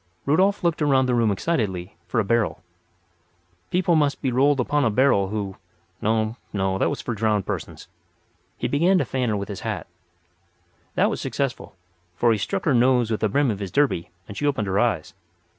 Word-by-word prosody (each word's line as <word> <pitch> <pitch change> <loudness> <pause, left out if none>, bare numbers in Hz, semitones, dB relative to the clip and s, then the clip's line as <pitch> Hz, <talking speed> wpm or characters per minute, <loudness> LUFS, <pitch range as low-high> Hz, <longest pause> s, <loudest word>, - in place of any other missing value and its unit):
Rudolf 190 +8 +2
looked 170 -2 +1
around 135 -3 +3
the 125 - 0
room 115 -2 +3
excitedly 100 - -2
for 115 - 0
a - - +2
barrel. 115 +1 0 1.1
People 180 -1 +2
must 145 -2 +2
be 130 - -1
rolled 135 +3 +3
upon 145 +4 +1
a 120 - +3
barrel 110 -4 +3
who—no, 110 +2 -3
no; 95 -1 0
that - - +2
was 145 - -4
for 120 - -3
drowned 105 -2 0
persons. - - -5 0.7
He - - -1
began 175 +7 +3
to 150 - +1
fan 125 -2 -1
her 105 - 0
with 100 0 -4
his 100 -3 -6
hat. - - -4 1.1
That - - +3
was - - -4
successful, 135 -7 -3 0.4
for 120 +6 +3
he 110 - +1
struck 195 - -2
her 150 - +3
nose 125 -1 +3
with 110 - 0
the 110 - +1
brim 140 +3 +2
of 100 - -4
his 100 -2 -4
derby 130 -6 +1 0.2
and 100 - -9
she 145 - -1
opened 135 -7 0
her 95 +1 0
eyes. 110 -10 0
120 Hz, 195 wpm, -23 LUFS, 105-145 Hz, 1.1 s, around